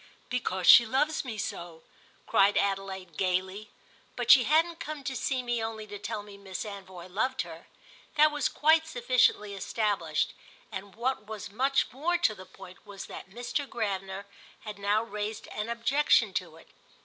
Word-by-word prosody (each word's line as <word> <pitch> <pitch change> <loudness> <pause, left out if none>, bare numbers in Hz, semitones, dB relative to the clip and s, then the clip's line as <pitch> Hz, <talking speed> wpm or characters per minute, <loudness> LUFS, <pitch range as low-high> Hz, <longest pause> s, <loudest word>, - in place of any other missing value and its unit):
"Because 190 -7 -1
she 235 - +10
loves 285 +7 0
me 235 -5 -6
so!" 170 -4 -5 0.4
cried 200 +1 +4
Adelaide 195 -3 -2
gaily. 190 +3 -1 0.5
But - - +3
she 255 -4 +8
hadn't 325 +4 +2
come 300 -2 -6
to 265 0 -3
see 255 +1 -1
me 240 -2 -1
only 220 -1 -4
to 205 -1 -8
tell 210 0 -4
me 205 -1 -13
Miss 195 +1 -6
Anvoy 190 -4 -9
loved 240 +8 -1
her: - - -11 0.5
that 305 0 +6
was 295 -2 0
quite 320 +1 +3
sufficiently 245 -6 +2
established, 195 -5 -1 0.4
and 195 0 -7
what 235 -2 -2
was 215 -2 -7
much 270 +5 +1
more 320 +8 0
to 295 -11 +2
the 185 -2 -12
point 185 0 -14
was 200 -1 -9
that - - -9
Mr. 245 +7 -3
Gravener 195 -3 -3 0.4
had 210 -2 -8
now 205 +2 +2
raised 210 -1 -5
an 210 +2 -4
objection 245 +6 +3
to - - -3
it. - - -18
215 Hz, 165 wpm, -29 LUFS, 195-255 Hz, 0.5 s, she